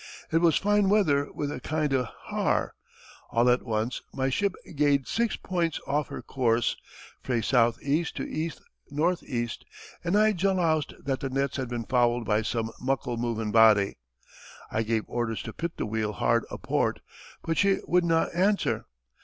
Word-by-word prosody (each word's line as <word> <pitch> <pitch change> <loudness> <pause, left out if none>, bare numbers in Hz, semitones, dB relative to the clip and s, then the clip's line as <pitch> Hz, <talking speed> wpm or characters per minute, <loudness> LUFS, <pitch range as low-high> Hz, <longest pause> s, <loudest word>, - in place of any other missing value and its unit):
It 165 - +4
was 165 -3 +4
fine 205 -1 +3
weather 150 -9 +3
wi' 145 0 -3
a - - -6
kind 155 -2 -1
o' 130 -2 +2 0.2
haar. - - 0 0.6
All 120 +1 +2
at 125 - +2
once, 115 +1 -2
my 135 0 -1
ship 200 +6 0 0.2
gaed 140 -2 +2
six 235 -1 0
points 170 -3 -1
aff 145 +1 0
her - - -7
coorse, 120 -3 +1 0.5
frae 125 -2 -1
S. 115 +3 -2 0.3
E. 145 +4 +2
to - - -4
E. 160 +2 -3 0.4
N. 165 +5 +2
E., 120 -3 -2 0.6
and 175 +4 +2
I 215 +1 +5
jaloused 175 -5 +1
that 135 -2 -1
the 135 - -3
nets 135 +1 -1
had 130 -3 -3
been 120 -2 -3
fouled 120 -1 +2
by 105 0 +2
some 115 0 -2
muckle 125 -2 -1
movin' 115 -2 -2
body. 105 - +5 0.7
I 110 - 0
gave 110 -1 0
orders 120 -2 -2
to 115 - -7
pit 170 0 -4
the - - -2
wheel 110 0 -2
hard 115 +2 +1
a - - -6
port, - - -1 0.4
but 165 -1 -1
she 200 -1 +4
wouldna 170 -2 +2
answer. 195 +4 +1
135 Hz, 170 wpm, -27 LUFS, 115-165 Hz, 0.7 s, I